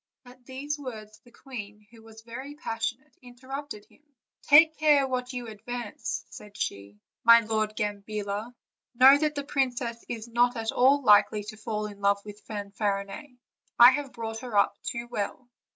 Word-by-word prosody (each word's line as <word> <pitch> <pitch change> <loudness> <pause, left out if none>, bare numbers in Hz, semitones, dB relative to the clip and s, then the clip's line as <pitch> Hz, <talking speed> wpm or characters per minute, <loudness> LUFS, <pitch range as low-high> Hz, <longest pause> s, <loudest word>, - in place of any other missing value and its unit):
At 245 0 -17
these 285 +3 -4
words 215 -5 -9
the 240 - -22
queen, 210 -6 -10
who 230 -1 -16
was 225 0 -15
very 260 +5 -8
passionate, 255 +1 -4
interrupted 260 -1 -8
him: - - -26 0.4
"Take 315 +2 +6
care 295 -3 +4
what 250 -1 -3
you 245 -2 -5
advance," 230 +1 -6
said 210 -1 -12
she, 100 +1 -5 0.3
"my 230 0 +8
Lord 215 -1 -2
Gambilla; 210 +1 -4 0.4
know 265 +3 +8
that 305 0 0
the 285 - -3
princess 245 -4 -2
is 230 -1 -5
not 240 +1 +2
at 225 0 -2
all 275 +3 +4
likely 210 -1 +5
to 210 +1 -8
fall 215 -1 -4
in 205 -1 -9
love 200 0 +3
with 210 0 -10
Fanfarinet; 200 +4 -4 0.5
I 240 +2 +10
have 275 0 -3
brought 225 -1 -6
her 235 -4 -4
up 200 - +3
too 235 -1 -5
well." 240 +2 -4
235 Hz, 165 wpm, -27 LUFS, 210-260 Hz, 0.5 s, I